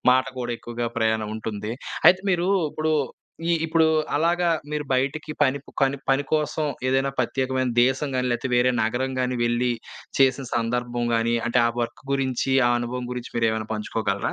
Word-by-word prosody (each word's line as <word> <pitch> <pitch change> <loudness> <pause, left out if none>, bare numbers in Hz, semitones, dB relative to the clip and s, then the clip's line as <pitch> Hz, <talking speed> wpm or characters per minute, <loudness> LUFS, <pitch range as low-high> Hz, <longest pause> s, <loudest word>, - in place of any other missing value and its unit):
మాట 130 +1 +4 0.2
కూడా 120 0 -2
ఎక్కువగా 120 0 -4
ప్రయాణం 110 -1 +1
ఉంటుంది. 110 0 -4 0.3
అయితే 185 +1 +7
మీరు 175 +1 +1 0.2
ఇప్పుడు 155 0 0 0.6
ఈ - - +3
ఇప్పుడు 160 0 +3 0.3
అలాగా 170 +3 +2 0.2
మీరు 150 -1 -2
బయటికి 140 +4 -1
పనిపు 140 0 0
కని 135 0 +2
పని 135 +1 +3
కోసం 155 0 0 0.2
ఏదైనా 135 +1 +2
పత్యేకమైన 130 0 0
దేశం 135 +3 +1
గానీ, 125 0 0
లేతే 125 +2 -2
వేరే 120 +1 +4
నగరం 125 +4 -1
గానీ, 125 0 0
వెళ్లి, 120 +1 +1 0.5
చేసిన 135 0 +3
సందర్భం 120 +1 -1
గానీ, 115 +1 +1
అంటే 125 +1 +3
ఆ - - +3
వర్క్ 120 0 -4
గురించి, 135 -1 0 0.2
ఆ - - +2
అనుభవం 125 +1 -4
గురించి 125 -1 -6
మీరేమైనా 110 -1 +1
పంచుకోగలరా? 105 -2 -2
125 Hz, 160 wpm, -24 LUFS, 120-140 Hz, 0.6 s, అయితే